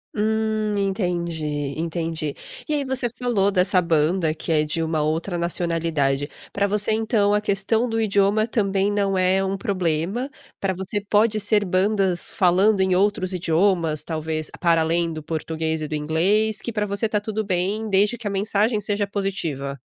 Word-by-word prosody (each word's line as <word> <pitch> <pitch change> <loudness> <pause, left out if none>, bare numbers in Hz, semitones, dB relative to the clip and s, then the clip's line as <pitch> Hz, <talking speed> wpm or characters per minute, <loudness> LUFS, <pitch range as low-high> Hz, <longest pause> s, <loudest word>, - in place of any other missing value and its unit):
Hum, 215 0 0
entendi, 175 -5 -1 0.3
entendi. 165 -2 -2 0.3
E 305 - -1
aí 290 -1 0
você 260 -2 -1
falou 225 -5 +1
dessa 185 -1 +4
banda 165 0 +1
que 160 - -5
é 155 -1 +3
de 155 +2 -2
uma 160 -1 0
outra 165 +4 -1
nacionalidade, 165 -5 0 0.2
para 200 - 0
você, 205 +1 +1
então, 215 -2 +2
a 210 - +3
questão 210 +3 +1
do 225 -1 -1
idioma 205 +1 +2
também 200 -3 +1
não 200 -1 0
é 185 +1 +2
um 195 +1 -1
problema, 185 - -1 0.3
pra 195 -1 0
você 190 +3 -3
pode 215 +1 +3
ser 205 0 +2
bandas 190 -1 +1
falando 190 +3 +3
em 190 -1 +2
outros 195 -1 +1
idiomas, 165 -3 +1
talvez 155 -1 -3
para 170 -2 +3
além 165 +1 0
do 155 - -6
português 160 0 -3
e - - -3
do 155 - -6
inglês, 190 +8 +1
que 235 - -5
pra 210 -1 -1
você 200 +3 -1
está 210 -1 0
tudo 215 +1 -3
bem, 195 +4 -1
desde 205 +3 +2
que 235 - -11
a 200 - -2
mensagem 210 +2 +1
seja 205 0 -1
positiva? 165 -9 -3
195 Hz, 170 wpm, -23 LUFS, 165-210 Hz, 0.3 s, dessa